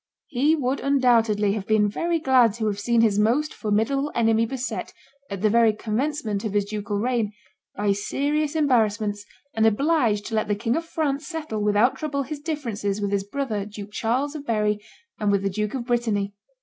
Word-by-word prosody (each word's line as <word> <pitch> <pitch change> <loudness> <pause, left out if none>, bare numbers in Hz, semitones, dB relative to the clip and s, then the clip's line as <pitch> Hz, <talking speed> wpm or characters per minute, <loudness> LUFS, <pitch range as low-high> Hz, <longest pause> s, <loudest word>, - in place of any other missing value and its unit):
He 290 +4 +2
would 270 -2 -1
undoubtedly 230 -7 +3
have 205 -2 -4
been 215 -1 +3
very 335 +11 0
glad 255 -8 +4
to 225 -2 -2
have 205 -1 -1
seen 235 +2 +2
his 210 -3 +3
most 255 +9 +2
formidable 225 +7 0
enemy 225 -1 +3
beset, 260 +1 -4 0.4
at 200 -2 -5
the 215 - +5
very 230 -1 +5
commencement 225 0 -2
of 215 -3 -3
his 205 -1 +1
ducal 205 0 -3
reign, 225 -1 0 0.4
by 205 0 +1
serious 285 +9 -1
embarrassments, 215 -8 +1 0.3
and 220 0 +3
obliged 230 -3 +2
to 230 - -6
let 215 -1 +1
the 205 - +1
king 230 +3 -1
of 330 +1 -2
France 295 -3 -2
settle 310 -11 -4
without 210 +4 +3
trouble 280 -2 -2
his 290 +2 -6
differences 235 -10 -3
with 200 -1 -2
his 200 -1 0
brother 220 -2 -3
Duke 205 0 -9
Charles 250 +7 -1
of 300 -2 -6
Berry, 210 -4 0 0.4
and 210 -1 +1
with 200 -1 +1
the 195 - 0
Duke 210 +4 -2
of 245 -3 -3
Brittany. 220 -5 0
225 Hz, 190 wpm, -24 LUFS, 210-275 Hz, 0.4 s, the